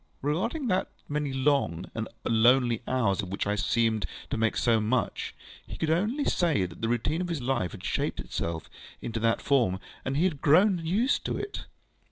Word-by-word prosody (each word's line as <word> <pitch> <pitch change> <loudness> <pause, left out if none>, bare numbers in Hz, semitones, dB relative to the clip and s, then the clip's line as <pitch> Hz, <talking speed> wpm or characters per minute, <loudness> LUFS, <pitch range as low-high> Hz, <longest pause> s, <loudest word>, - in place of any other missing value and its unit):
Regarding 210 - -1
those 185 -5 +1 0.2
many 145 -1 -1
long 130 - 0
and 110 0 -3 0.2
lonely 120 +1 +4
hours 110 -7 +1
of 95 - -6
which 100 - -2
I 105 - +1
seemed 110 +1 +1 0.2
to - - +1
make 115 -1 +1
so 115 -2 +3
much, 120 +4 -1 0.3
he - - -7
could 160 -1 0
only 215 - +1
say 160 - +2
that 90 -1 -10
the 115 - 0
routine 145 +8 0
of 180 - -2
his 165 -3 -1
life 120 - 0
had - - -10
shaped - - -1
itself 85 -1 -4 0.3
into 115 -1 -4
that 115 0 +1
form, 120 -10 +2 0.2
and 135 +1 -1
he 160 - +3
had 170 -7 0
grown 180 +5 +5
used 210 - +1
to - - -1
it. 410 0 -5
130 Hz, 190 wpm, -28 LUFS, 110-165 Hz, 0.3 s, grown